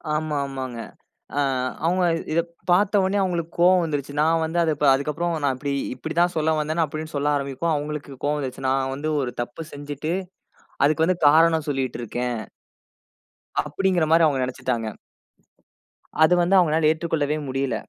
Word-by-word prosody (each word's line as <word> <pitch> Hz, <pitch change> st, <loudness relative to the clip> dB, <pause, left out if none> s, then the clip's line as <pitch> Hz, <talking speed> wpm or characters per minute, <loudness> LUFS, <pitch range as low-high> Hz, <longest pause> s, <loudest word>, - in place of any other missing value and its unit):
ஆமா, 155 Hz, 0 st, -2 dB
ஆமாங்க. 130 Hz, -3 st, -5 dB, 0.6 s
ஆ -, -, +3 dB, 0.5 s
அவுங்க 180 Hz, +2 st, +2 dB, 0.3 s
இத 170 Hz, -, +3 dB, 0.3 s
பார்த்த 200 Hz, +3 st, +4 dB
உடனே 190 Hz, +2 st, +1 dB
அவுங்களுக்கு 170 Hz, -3 st, -2 dB
கோவம் 180 Hz, +1 st, +5 dB
வந்துரச்சு. 145 Hz, -3 st, -3 dB
நான் 160 Hz, +1 st, +3 dB
வந்து 165 Hz, +2 st, -2 dB
அத 160 Hz, -, +2 dB, 0.2 s
அதுக்கு 140 Hz, +3 st, 0 dB
அப்புறம் 170 Hz, +2 st, -1 dB
நான் 135 Hz, -, +2 dB
இப்பிடி 140 Hz, +2 st, -3 dB, 0.2 s
இப்பிடி 160 Hz, +5 st, -6 dB
தான் 175 Hz, +1 st, +2 dB
சொல்ல 160 Hz, 0 st, +2 dB
வந்தேன்னு 155 Hz, +2 st, 0 dB
அப்பிடின்னு 155 Hz, +1 st, -6 dB
சொல்ல 145 Hz, +1 st, +1 dB
ஆரம்பிப்போம். 140 Hz, +4 st, -1 dB
அவுங்களுக்கு 145 Hz, -1 st, -5 dB
கோவம் 150 Hz, +1 st, +1 dB
வந்துருச்சு. 135 Hz, -1 st, -4 dB
நான் 135 Hz, 0 st, 0 dB
வந்து 155 Hz, +3 st, -3 dB
ஒரு 125 Hz, -3 st, -2 dB
தப்பு 120 Hz, +7 st, -7 dB
செஞ்சிட்டு 145 Hz, +2 st, -4 dB, 0.7 s
அதுக்கு 155 Hz, +2 st, +3 dB
வந்து 180 Hz, 0 st, +1 dB
காரணம் 160 Hz, 0 st, +4 dB
சொல்லிட்டு 135 Hz, -3 st, -2 dB
இருக்கேன். 120 Hz, 0 st, -3 dB, 1.2 s
அப்பிடிங்கிறமாரி 165 Hz, +1 st, +2 dB
அவுங்க 135 Hz, -3 st, 0 dB
நினச்சிட்டாங்க. 125 Hz, -2 st, -3 dB, 1.4 s
அது 160 Hz, -, +5 dB
வந்து 175 Hz, +3 st, +3 dB
அவுங்கனால 160 Hz, -3 st, +4 dB
ஏத்துக்கொள்ளவே 155 Hz, -2 st, -1 dB
முடியல. 135 Hz, -1 st, -1 dB
155 Hz, 150 wpm, -23 LUFS, 140-165 Hz, 1.4 s, கோவம்